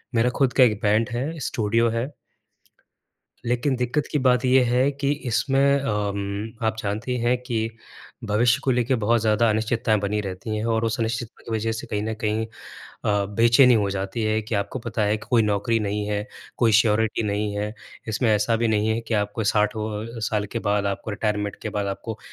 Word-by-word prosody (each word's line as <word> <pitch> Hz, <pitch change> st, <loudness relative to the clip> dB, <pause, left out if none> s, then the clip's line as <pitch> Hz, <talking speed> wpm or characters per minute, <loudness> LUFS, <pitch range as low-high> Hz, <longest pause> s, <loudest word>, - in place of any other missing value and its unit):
मेरा 115 Hz, +2 st, +3 dB
खुद 135 Hz, -3 st, +3 dB
का 130 Hz, -, +6 dB
एक 110 Hz, -4 st, +3 dB
बैंड 110 Hz, +3 st, +2 dB
है 150 Hz, +7 st, -3 dB
स्टूडियो 115 Hz, -2 st, +1 dB
है। 115 Hz, +5 st, -2 dB, 1.4 s
लेकिन 125 Hz, +3 st, +1 dB
दिक्कत 125 Hz, +4 st, -1 dB
की 150 Hz, -, +2 dB
बात 125 Hz, -1 st, +3 dB
ये 130 Hz, 0 st, +5 dB
है 125 Hz, +3 st, +2 dB
कि 140 Hz, 0 st, -1 dB, 0.2 s
इसमें 140 Hz, +3 st, +3 dB
अ, 135 Hz, -, -3 dB
उम, 100 Hz, +1 st, -2 dB
आप 110 Hz, -, 0 dB
जानती 110 Hz, +5 st, -2 dB
हैं 120 Hz, +2 st, +2 dB
कि 115 Hz, -2 st, -1 dB, 0.6 s
भविष्य 115 Hz, +3 st, +2 dB
को 135 Hz, -, +2 dB
लेके 125 Hz, +1 st, +2 dB
बहुत 115 Hz, +1 st, +3 dB
ज़्यादा 110 Hz, +1 st, +3 dB
अनिश्चितताएँ 110 Hz, +1 st, +1 dB
बनी 105 Hz, +1 st, -1 dB
रहती 100 Hz, +2 st, -4 dB
हैं 105 Hz, -, -2 dB
और 110 Hz, 0 st, 0 dB
उस 110 Hz, -1 st, -1 dB
अनिश्चितता 115 Hz, 0 st, -3 dB
की 115 Hz, -, -6 dB
वज़ह 110 Hz, +1 st, -1 dB
से 110 Hz, -, -5 dB
कहीं 105 Hz, -1 st, -2 dB
न 110 Hz, +1 st, -2 dB
कहीं 110 Hz, +1 st, 0 dB
अ, 110 Hz, -, -23 dB, 0.7 s
बेचैनी 120 Hz, +5 st, +5 dB
हो 100 Hz, -3 st, +1 dB
जाती 100 Hz, +4 st, -3 dB
है 110 Hz, 0 st, +1 dB
कि 110 Hz, +1 st, -4 dB
आपको 100 Hz, +5 st, -2 dB
पता 115 Hz, -2 st, -3 dB
है 105 Hz, +1 st, +2 dB
कि 110 Hz, +1 st, -12 dB
कोई 120 Hz, -2 st, +5 dB
नौकरी 105 Hz, +2 st, +1 dB
नहीं 105 Hz, 0 st, -2 dB
है 105 Hz, 0 st, -2 dB, 0.3 s
कोई 115 Hz, -3 st, +3 dB
श्योरिटी 110 Hz, 0 st, +1 dB
नहीं 105 Hz, 0 st, -1 dB
है। 105 Hz, +1 st, -3 dB, 0.3 s
इसमें 110 Hz, +2 st, +1 dB
ऐसा 105 Hz, +2 st, +1 dB
भी 115 Hz, 0 st, +1 dB
नहीं 110 Hz, 0 st, +1 dB
है 110 Hz, +1 st, 0 dB
कि 115 Hz, 0 st, -3 dB
आपको 105 Hz, +1 st, -1 dB
साठों 110 Hz, +2 st, -1 dB
साल 105 Hz, -1 st, -1 dB
के 115 Hz, -, -1 dB
बाद 100 Hz, 0 st, +1 dB
आपको 100 Hz, +2 st, -3 dB
रिटायरमेंट 105 Hz, -1 st, -2 dB
के 110 Hz, -, -3 dB
बाद 100 Hz, -, -1 dB
आपको 100 Hz, +3 st, -5 dB
110 Hz, 200 wpm, -24 LUFS, 105-120 Hz, 1.4 s, का